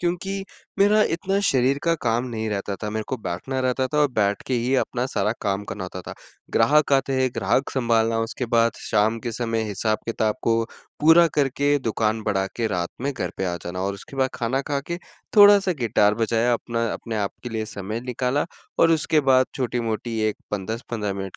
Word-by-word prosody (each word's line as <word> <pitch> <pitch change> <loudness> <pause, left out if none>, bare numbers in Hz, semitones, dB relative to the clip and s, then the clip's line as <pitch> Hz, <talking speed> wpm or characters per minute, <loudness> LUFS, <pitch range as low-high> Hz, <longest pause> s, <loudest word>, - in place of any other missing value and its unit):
क्योंकि 190 +3 -2 0.3
मेरा 210 +2 +5
इतना 195 +3 -1
शरीर 130 +1 +2
का 165 0 +3
काम 120 +1 +1
नहीं 110 -2 -3
रहता 100 -1 -3
था, 105 -1 -5
मेरे 110 0 -2
को 130 - -1
बैठना 115 +6 -4
रहता 130 +1 +1
था 150 +3 -2
और 145 - +4
बैठ 105 -3 0
के 130 - 0
ही 125 +3 0
अपना 125 -1 0
सारा 110 -4 0
काम 100 0 -1
करना 95 -2 -5
होता 90 0 -7
था। - - -8 0.4
ग्राहक 150 -1 +3
आते 135 0 +2
हैं, 130 - +3
ग्राहक 135 - +1
सँभालना 115 -3 +1
उसके 115 +2 -3
बाद 115 0 +3
शाम 110 +2 +1
के 120 -2 -4
समय 115 -1 -1
हिसाब-किताब 110 +1 -1
को 115 0 +2 0.4
पूरा 165 +3 +7
करके 145 0 +2
दुकान 110 -2 -1
बढ़ा 95 -3 0
के 115 -1 0
रात 90 -4 -1
में 140 +2 -1
घर 125 - -3
पे 95 - -2
आ 90 -1 -1
जाना 90 +1 -4
और 100 +1 -1
उसके 115 +7 -11
बाद 130 0 +2
खाना 125 +2 -1
खा 140 0 -2
के 170 - -3 0.4
थोड़ा-सा 205 -2 +7
गिटार 105 -3 +3
बजाया 115 +2 +1
अपना, 115 0 -1
अपने 115 -2 -5
आपके 105 +4 -4
लिए 110 -1 -3
समय 105 +2 -5
निकाला 125 +3 -1 0.3
और 165 - +5
उसके 155 -1 +3
बाद 130 -2 +4
छोटी-मोटी 115 -2 -2
एक 105 - -3
पन 100 -2 -2
10-15 110 -2 -3
मिनट 95 -1 -6
115 Hz, 195 wpm, -23 LUFS, 110-135 Hz, 0.4 s, पूरा